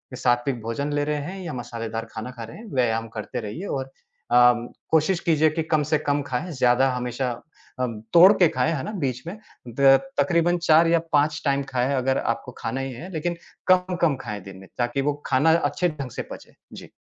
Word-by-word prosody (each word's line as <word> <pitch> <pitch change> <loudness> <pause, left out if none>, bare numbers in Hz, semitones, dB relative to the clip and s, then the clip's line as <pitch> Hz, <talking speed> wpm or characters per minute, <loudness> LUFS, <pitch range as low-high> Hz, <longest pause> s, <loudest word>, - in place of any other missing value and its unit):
सात्विक 120 0 0
भोजन 115 +6 -3
ले 145 - +1
रहे 150 0 -1
हैं 185 +6 -6
या 160 - -5
मसालेदार 115 -2 -5
खाना 115 +2 -6
खा 120 -2 -8
रहे 115 - -10
हैं, 230 - -11
व्यायाम 115 -3 +1
करते 125 +4 -4
रहिए 115 - -6
और 135 -1 -4 0.4
अ, 120 - +5 0.5
कोशिश 160 +3 +2
कीजिए 155 -1 +3
कि 160 +1 -2
कम 155 -2 +1
से 155 - +4
कम 145 -1 0
खाएँ 140 +6 -4
ज़्यादा 130 -1 +3
हमेशा 125 +1 -2 0.5
अ, 125 - +1 0.3
तोड़ 180 +4 +9
के 175 - +7
खाएँ, 130 +6 0
है 135 - -3
ना? - - -4
बीच 135 - -3
में 190 +5 -6 0.4
द 135 -1 +7 0.2
तकरीबन 175 0 +2
4 165 -1 +4
या 165 0 +4
5 145 0 +2
टाइम 140 0 +1
खाएँ 130 +2 0
अगर 130 +1 +1
आपको - - -2
खाना 130 +4 -3
ही 135 - -4
है, 175 +10 -9
लेकिन 170 +2 -2 0.4
कम-कम 180 -4 +2
खाएँ 105 -3 -6
दिन 95 -1 -10
में 95 0 -13
ताकि 120 +2 0
वो 145 +2 +1
खाना 150 +5 +3
अच्छे 180 +1 0
ढंग 140 -5 -6
से - - -4
पचे। - - -10 0.2
जी। - - -10
140 Hz, 205 wpm, -24 LUFS, 125-160 Hz, 0.5 s, तोड़